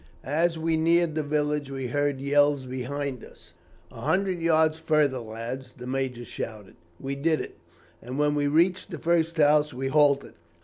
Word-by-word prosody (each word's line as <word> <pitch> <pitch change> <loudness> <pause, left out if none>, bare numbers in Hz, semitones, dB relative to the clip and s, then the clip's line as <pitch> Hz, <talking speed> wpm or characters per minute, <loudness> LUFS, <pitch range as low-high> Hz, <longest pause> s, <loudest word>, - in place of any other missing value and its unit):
As 165 +5 +1
we 160 0 0
neared 165 0 +3
the 155 - -1
village, 150 -1 -1
we 135 -1 -4
heard 145 +2 0
yells 145 0 +2
behind 130 0 -4
us. 85 0 -16 0.4
"'A 115 - -11
hundred 185 +4 0
yards 160 -1 +3
further, 150 -5 +2
lads,' 120 +3 -7
the 125 - -8
major 130 -2 -3
shouted. 105 -4 -7 0.3
We 135 +1 -4
did 155 +3 +1
it, - - -8 0.4
and 125 +3 -6
when 150 0 +2
we 145 -1 +1
reached 175 +5 +2
the 170 - -6
first 165 +1 +1
house 150 -2 +3
we 135 +1 -2
halted. 145 -1 +3
145 Hz, 170 wpm, -26 LUFS, 130-160 Hz, 0.4 s, neared